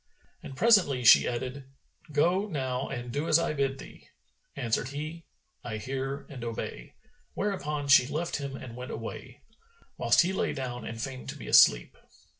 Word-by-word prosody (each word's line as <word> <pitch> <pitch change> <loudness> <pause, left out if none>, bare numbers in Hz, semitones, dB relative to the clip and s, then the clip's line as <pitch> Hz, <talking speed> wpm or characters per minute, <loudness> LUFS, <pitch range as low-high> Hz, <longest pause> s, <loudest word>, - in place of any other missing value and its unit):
And 135 - -10
presently 185 - +4
she - - +8
added, 130 +3 -4 0.5
"Go 175 +7 +2
now 130 -7 -3
and 120 -1 -5
do 145 +6 -2
as 155 - +5
I 170 -2 0
bid 135 -2 -1
thee." - - -13 0.5
Answered 120 -2 -1
he, 155 +4 -6 0.4
"I 110 - -4
hear 135 +5 -4
and 130 -4 -9
obey;" 115 - -6 0.4
whereupon 150 -8 -2
she 135 -2 +6
left 165 +4 -2
him 140 -2 -5
and 125 -4 -9
went 125 +1 -7
away, 125 +4 -8 0.5
whilst - - +4
he 185 +2 0
lay - - -1
down 125 -3 -5
and 115 0 -6
feigned 130 +1 -6
to - - -6
be - - -9
asleep. - - +5
135 Hz, 165 wpm, -28 LUFS, 125-150 Hz, 0.5 s, she